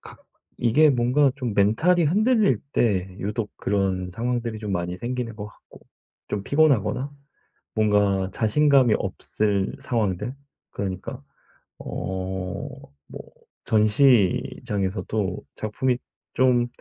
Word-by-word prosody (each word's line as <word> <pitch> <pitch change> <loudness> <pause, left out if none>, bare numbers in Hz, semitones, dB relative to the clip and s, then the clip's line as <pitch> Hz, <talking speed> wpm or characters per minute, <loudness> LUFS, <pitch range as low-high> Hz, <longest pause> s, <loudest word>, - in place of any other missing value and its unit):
가 - - -13 0.4
이게 145 +6 +4
뭔가 130 +3 +3
좀 120 -6 -3
멘탈이 160 - +3
흔들릴 210 - +3
때 95 -5 +1
유독 105 +2 -3
그런 95 -2 -1
상황들이 115 +1 -2
좀 105 -2 -4
많이 90 0 -2
생기는 120 -1 -4
것 105 -1 -6
같고 105 - -17 0.5
좀 100 - -3
피곤하거나 140 -2 +2 0.6
뭔가 105 -3 +2
자신감이 130 +1 +4
없을 100 -2 -1
상황들 110 +1 -2 0.4
그러니까 95 -2 -5 0.6
어 95 0 -4 0.5
뭐 - - -7 0.5
전시장에서도 105 -3 +1
작품이 125 +4 -1 0.4
좀 125 -2 +3
110 Hz, 225 characters per minute, -24 LUFS, 100-125 Hz, 0.6 s, 이게